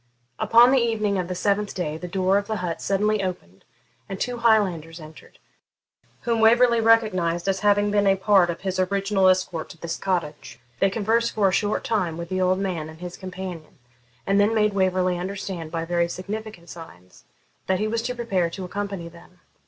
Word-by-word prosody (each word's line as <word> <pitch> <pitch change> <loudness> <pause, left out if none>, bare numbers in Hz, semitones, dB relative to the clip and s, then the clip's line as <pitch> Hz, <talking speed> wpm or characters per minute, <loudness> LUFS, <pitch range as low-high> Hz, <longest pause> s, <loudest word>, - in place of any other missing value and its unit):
Upon 240 +2 +6
the 265 - +4
evening 215 -4 0
of 180 - -3
the 180 - -4
seventh 200 +2 -1
day 155 -5 -3
the 180 +3 -7
door 190 +2 +1
of 200 - -8
the 220 - -2
hut 180 -4 -4
suddenly 210 +1 +1
opened, 135 - -6 0.4
and 195 -1 -5
two 245 0 -2
Highlanders 185 -8 +1
entered, 155 0 -14 0.8
whom 230 -1 0
Waverley 235 +1 +5
recognised 195 -7 +2
as 195 -1 +1
having 205 0 +2
been 205 -1 +2
a 195 - +4
part 190 -2 +3
of 170 - -4
his 190 0 -3
original 195 0 +2
escort 185 -3 -1
to - - -12
this 165 +1 -5
cottage. 165 -9 -3 0.2
They 195 - +3
conversed 225 +3 0
for 200 -3 +2
a - - -3
short 205 +2 0
time 180 -8 -1
with 170 0 -6
the 185 0 -1
old 185 0 +2
man 180 -5 -3
and 160 0 -13
his 180 0 -7
companion, 185 -4 -8 0.5
and 195 +1 +2
then 210 +2 +3
made 210 -1 +2
Waverley 185 -2 +1
understand, 185 -3 -5
by 165 0 -3
very 170 0 0
significant 200 -1 -7
signs, 90 - -13 0.4
that 190 - +2
he 215 - -1
was 225 +1 -1
to 250 +2 -4
prepare 195 -8 -1
to 185 +2 -7
accompany 200 -2 -5
them. 175 +2 -17
190 Hz, 190 wpm, -24 LUFS, 175-210 Hz, 0.8 s, Upon